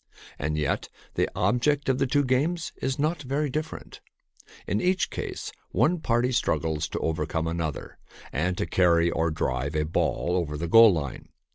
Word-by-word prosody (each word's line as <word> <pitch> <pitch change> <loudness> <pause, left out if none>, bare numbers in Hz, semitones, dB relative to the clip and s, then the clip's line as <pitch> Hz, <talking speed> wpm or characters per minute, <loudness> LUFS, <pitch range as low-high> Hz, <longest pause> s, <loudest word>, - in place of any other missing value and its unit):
And 75 +2 -1
yet 75 -2 -1 0.2
the - - +1
object 125 +9 +1
of 130 -1 +2
the 135 - +2
two 145 +2 +2
games 155 +7 0
is 130 0 -1
not 155 +2 0
very 140 +1 -1
different. 155 +3 -5 0.6
In 105 - -1
each 185 0 +1
case - - -5 0.2
one 175 +2 +2
party 120 -3 +1
strug 125 - +1
gles 80 -2 -2
to - - -3
overcome 80 0 -1
another 80 -2 -4 0.3
and 90 +6 0
to - - 0
carry, 85 -2 +3
or 85 0 +1
drive, 70 -1 -2
a 75 - +2
ball 85 +2 0
over 80 -5 -1
the 85 +3 -3
goal 115 +5 +8
line. 75 -7 -4
95 Hz, 170 wpm, -26 LUFS, -, 0.6 s, goal